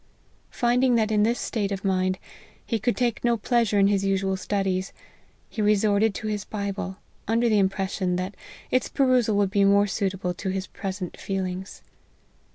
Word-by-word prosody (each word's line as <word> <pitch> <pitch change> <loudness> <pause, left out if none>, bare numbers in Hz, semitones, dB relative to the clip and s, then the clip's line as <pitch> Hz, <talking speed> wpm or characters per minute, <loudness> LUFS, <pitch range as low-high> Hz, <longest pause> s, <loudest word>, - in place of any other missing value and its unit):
Finding 245 +1 +2
that 220 -1 +2
in 210 -1 +3
this 230 +3 +2
state 205 -3 -2
of 195 0 -4
mind, 185 -1 +1 0.5
he 230 - -1
could 240 +3 0
take 240 -3 0
no 235 -1 +2
pleasure 230 -1 +1
in 200 - +5
his 200 -1 +2
usual 195 0 +1
studies, 190 0 -1 0.5
he 220 - -4
resorted 210 0 +3
to 220 - -5
his 210 -1 -2
Bible, 200 -2 -4 0.3
under 230 +2 +2
the 215 -2 +3
impression 190 -1 0
that 185 +2 -3 0.4
its 255 - +1
perusal 250 -6 +2
would 200 -2 +2
be 200 -1 +3
more 200 +1 +5
suitable 190 -3 -2
to 190 +2 -4
his 190 0 -2
present 190 -3 -6
feelings. 190 -1 -4
200 Hz, 165 wpm, -25 LUFS, 190-220 Hz, 0.5 s, in